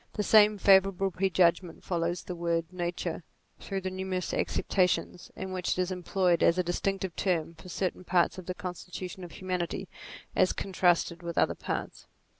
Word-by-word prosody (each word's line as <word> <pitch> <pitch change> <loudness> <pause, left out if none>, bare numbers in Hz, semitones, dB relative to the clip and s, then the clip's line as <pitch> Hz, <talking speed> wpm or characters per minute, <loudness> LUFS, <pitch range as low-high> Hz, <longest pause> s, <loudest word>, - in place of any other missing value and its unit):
The 210 - -1
same 210 0 +6
favour 195 0 +6
able 195 0 -2
prejudgment 180 -2 +1
follows 170 0 -1
the 180 - -5
word 170 -1 0
nature 175 -1 -3 0.4
through 195 -1 -4
the 185 0 -3
numerous 185 -1 -3
acceptations, 180 -1 0
in 190 0 -5
which 180 -1 -1
it - - -2
is 185 0 0
employed 180 -1 +1
as 170 - +4
a 180 - +2
distinctive 190 +1 -2
term 170 -4 0
for 185 +2 -13
certain 185 0 -2
parts 180 +1 +2
of 185 - -11
the 185 - -3
constitution 180 +1 -7
of 175 - -9
humanity 180 -2 -3 0.5
as - - +3
contrasted 180 -2 +1
with 170 -1 -6
other - - +3
parts. - - -5
180 Hz, 170 wpm, -29 LUFS, 175-190 Hz, 0.5 s, same